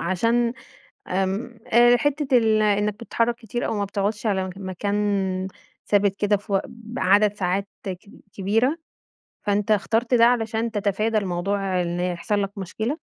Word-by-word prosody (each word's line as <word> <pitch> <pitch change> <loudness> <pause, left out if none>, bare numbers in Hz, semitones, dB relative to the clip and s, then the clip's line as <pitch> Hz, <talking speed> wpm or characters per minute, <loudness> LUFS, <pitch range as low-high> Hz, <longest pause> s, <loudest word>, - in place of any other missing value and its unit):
عشان 230 +7 +1 0.5
آمم 195 +6 -2
أ 240 +1 +6
حتّة 290 -1 +1
ال 220 -1 +3
إنّك 210 0 +2
بتتحرّك 230 +1 -1
كتير 240 0 -4
أو - - -1
ما 200 - 0
بتقعدش 205 +2 -2
على 190 -2 +1
م 185 - -5
مكان 195 0 -1 0.4
ثابت 200 -1 +2
كده 205 0 +2
في 205 +1 -9
وق 195 - +3
بعدد 215 -3 +1
ساعات 195 +1 -1 0.2
كب 195 +2 -8
كبيرة، 225 - +1 0.7
فأنت 205 +1 0
اخترت 225 +4 +2
ده 230 -1 +6
علشان 230 -1 +1
تتفادى 215 +1 0
الموضوع 190 0 -1
إن 175 0 -3
يحصل 180 +3 -1
لك 200 +1 -5
مشكلة؟ 220 - -3
205 Hz, 145 wpm, -23 LUFS, 195-230 Hz, 0.7 s, أ